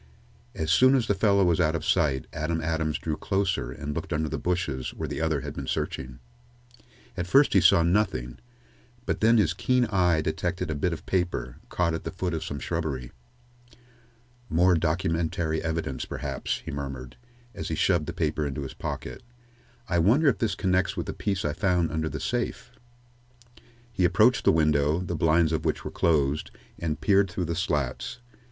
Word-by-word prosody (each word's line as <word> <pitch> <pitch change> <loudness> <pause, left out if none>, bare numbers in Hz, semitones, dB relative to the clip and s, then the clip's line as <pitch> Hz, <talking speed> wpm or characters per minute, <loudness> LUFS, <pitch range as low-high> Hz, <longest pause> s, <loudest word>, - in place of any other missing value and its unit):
As 80 0 -1
soon 130 +7 +6
as 125 -4 +2
the 100 - +2
fellow 100 -1 +3
was 85 -2 +2
ought 80 +1 +2
of 80 - -3
sight, 75 -7 +1
Adam 80 +2 -1
Adams 80 -1 -1
drew 80 -2 -3
closer 95 -8 -1
and 75 +3 -5
looked - - -5
under 80 0 0
the - - -3
bushes 80 -8 -2
where - - -4
the - - -4
other 80 -4 0
had - - -6
been - - -6
searching. 65 -2 -3 1.0
At 90 -1 -3
first 140 +9 +5
he 95 - +5
saw 95 0 +6
nothing, 85 - 0 0.7
but - - -2
then 115 +2 +5
his 90 -6 +3
keen 125 +7 +2
eye 90 -5 +3
detected 85 +2 -2
a - - 0
bit 80 +4 0
of 85 - -6
paper, 90 -9 -1
caught 85 -2 0
at 80 - -4
the - - -4
foot 90 -1 -3
of 80 - -2
some 70 - -5
shrubbery. 70 -5 -3 1.4
"More 90 +2 +4
documentary 80 -1 0
evidence, 80 -5 -2
perhaps," - - -4
he - - -5
murmured, 70 -3 -6 0.4
as 100 - -5
he 80 - -2
shoved 85 -1 +2
the - - -2
paper 80 -1 -1
into 70 +1 -4
his 65 - -7
pocket. - - -6 0.7
"I 85 -4 +1
wonder 120 - +4
if - - -1
this 105 -5 0
connects 95 -1 0
with - - -2
the - - -4
piece 100 -3 -2
I 75 - 0
found 90 0 +1
under 80 0 -1
the - - -5
safe?" - - -3 1.2
He 95 - 0
approached 90 - +4
the - - +7
window, 75 -1 +2
the 90 -1 -3
blinds 80 +1 +3
of 80 - -1
which - - -1
were - - -4
closed, 75 -3 +1 0.3
and 80 -2 -2
peered 100 +1 +3
through 90 +1 -3
the 85 0 -2
slats. 75 - -2
80 Hz, 185 wpm, -26 LUFS, 75-90 Hz, 1.4 s, the